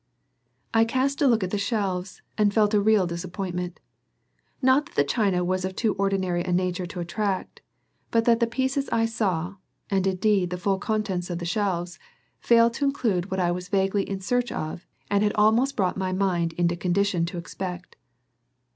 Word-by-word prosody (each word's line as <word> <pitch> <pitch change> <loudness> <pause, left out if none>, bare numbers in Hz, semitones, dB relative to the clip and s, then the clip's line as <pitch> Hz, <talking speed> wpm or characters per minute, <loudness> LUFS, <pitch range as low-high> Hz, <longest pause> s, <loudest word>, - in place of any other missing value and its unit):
I 225 0 +5
cast 260 +5 0
a 285 - +5
look 230 -5 +3
at 185 - -3
the 205 - -1
shelves 195 -3 -2
and 210 -1 +3
felt 210 0 +2
a 210 - +4
real 210 -2 +4
disappointment. 175 +1 -4 0.8
Not 265 +2 +3
that - - -21
the 145 - +4
china 180 - +1
was 185 +1 0
of 190 0 -3
too 220 -1 +1
ordinary 190 -3 0
a 180 - -3
nature 180 0 0
to 185 0 -7
attract, 190 +3 -3 0.5
but 230 0 +2
that 230 -1 +4
the 235 - +2
pieces 265 +3 -1
I 225 0 +2
saw, 195 -5 -1 0.3
and 195 -1 +2
indeed 190 -1 +2
the 180 - -3
full 190 +2 0
contents 200 -5 -2
of 175 - -2
the 170 - -5
shelves, 180 -2 -2 0.4
failed 230 0 +4
to 280 - -1
include 220 -10 0
what 190 - -2
I 175 -1 +2
was 180 +1 -5
vaguely 195 +1 +1
in 195 -1 -3
search 245 +5 0
of 155 +3 -5 0.2
and 200 0 +3
had 210 0 +2
almost 225 +6 +3
brought 185 -2 0
my 190 -1 -1
mind 180 -3 0
into 175 0 +1
condition 180 0 +1
to 175 - -6
expect. 180 +1 -6
195 Hz, 185 wpm, -25 LUFS, 180-220 Hz, 0.8 s, I